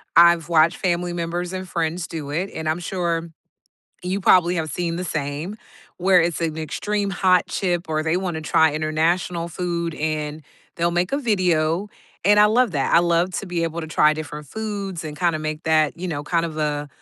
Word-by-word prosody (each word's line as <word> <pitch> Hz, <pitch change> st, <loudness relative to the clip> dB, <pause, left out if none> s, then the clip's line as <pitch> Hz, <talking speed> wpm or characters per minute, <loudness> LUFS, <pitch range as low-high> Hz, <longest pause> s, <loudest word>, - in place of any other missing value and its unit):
I've 170 Hz, -1 st, +6 dB
watched 165 Hz, +1 st, +4 dB
family 175 Hz, -1 st, 0 dB
members 175 Hz, +1 st, -3 dB
and 185 Hz, 0 st, -5 dB
friends 170 Hz, 0 st, -2 dB
do 150 Hz, -4 st, -6 dB
it, 175 Hz, +7 st, -2 dB
and 160 Hz, -1 st, -3 dB
I'm 160 Hz, +3 st, 0 dB
sure 170 Hz, -2 st, -2 dB, 0.7 s
you 185 Hz, +2 st, -2 dB
probably 180 Hz, -1 st, +5 dB
have 155 Hz, -2 st, -2 dB
seen 170 Hz, +1 st, -2 dB
the 180 Hz, -, -3 dB
same. 155 Hz, +5 st, -3 dB, 0.4 s
Where 185 Hz, 0 st, +4 dB
it's 170 Hz, 0 st, -1 dB
an 160 Hz, -1 st, -1 dB
extreme 200 Hz, +6 st, -2 dB
hot 185 Hz, -1 st, +3 dB
chip 175 Hz, -3 st, -1 dB
or 155 Hz, 0 st, 0 dB
they 160 Hz, +2 st, +1 dB
wanna 175 Hz, -4 st, -2 dB
try 160 Hz, 0 st, +3 dB
international 165 Hz, +3 st, 0 dB
food, 170 Hz, -1 st, -3 dB
and 155 Hz, 0 st, -3 dB, 0.3 s
they'll 170 Hz, 0 st, +1 dB
make 175 Hz, +2 st, 0 dB
a 280 Hz, -, +1 dB
video, 180 Hz, -, +1 dB, 0.4 s
and 205 Hz, +1 st, +5 dB
I -, -, +8 dB
love 235 Hz, +1 st, +3 dB
that, 135 Hz, -3 st, 0 dB
I -, -, +8 dB
love 175 Hz, +1 st, +1 dB
to 200 Hz, -, -8 dB
be 175 Hz, -2 st, -2 dB
able 165 Hz, 0 st, -3 dB
to 160 Hz, -, -6 dB
try 155 Hz, 0 st, +4 dB
different 150 Hz, -1 st, -7 dB
foods 200 Hz, -1 st, -4 dB
and 150 Hz, -1 st, -7 dB
kinda 170 Hz, -3 st, +1 dB
make 155 Hz, 0 st, -4 dB
that, 155 Hz, -1 st, +2 dB
you 185 Hz, -, -4 dB
know, 145 Hz, -3 st, -3 dB
kind 170 Hz, +2 st, 0 dB
of 155 Hz, -2 st, -7 dB
a, 150 Hz, -1 st, -1 dB
170 Hz, 195 wpm, -22 LUFS, 155-180 Hz, 0.7 s, I